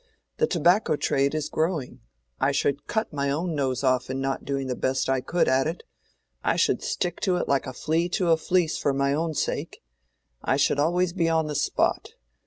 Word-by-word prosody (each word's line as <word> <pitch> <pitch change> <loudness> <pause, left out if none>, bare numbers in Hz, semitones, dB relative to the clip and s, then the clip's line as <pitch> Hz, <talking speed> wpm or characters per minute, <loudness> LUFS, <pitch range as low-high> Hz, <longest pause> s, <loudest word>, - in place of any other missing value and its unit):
The 465 - +2
tobacco 175 - +3
trade 140 0 +1
is 155 -1 -1
growing. 160 -4 -2 0.4
I 135 - +2
should 140 0 0
cut 220 -6 -2
my 140 -1 -1
own 165 +5 -1
nose 135 -3 -1
off 130 -1 +1
in 130 0 -2
not 135 0 -2
doing 140 -1 -2
the 130 -1 -2
best 130 +1 0
I 135 -1 +1
could 170 +7 +1
at 135 +2 +3
it. 165 +3 -4 0.6
I - - +2
should - - +2
stick 175 -1 -2
to 185 -2 +1
it - - -1
like 140 -2 +1
a - - -4
flea 165 +6 0
to 180 -5 +2
a 165 - +5
fleece 170 0 +1
for 140 - +1
my 140 0 +1
own 160 +1 -1
sake. - - -3 0.6
I 135 - +1
should 140 0 +2
always 175 +3 +1
be 170 -3 +1
on 160 -1 +2
the 150 - -4
spot. 145 - 0
150 Hz, 205 wpm, -25 LUFS, 135-170 Hz, 0.6 s, a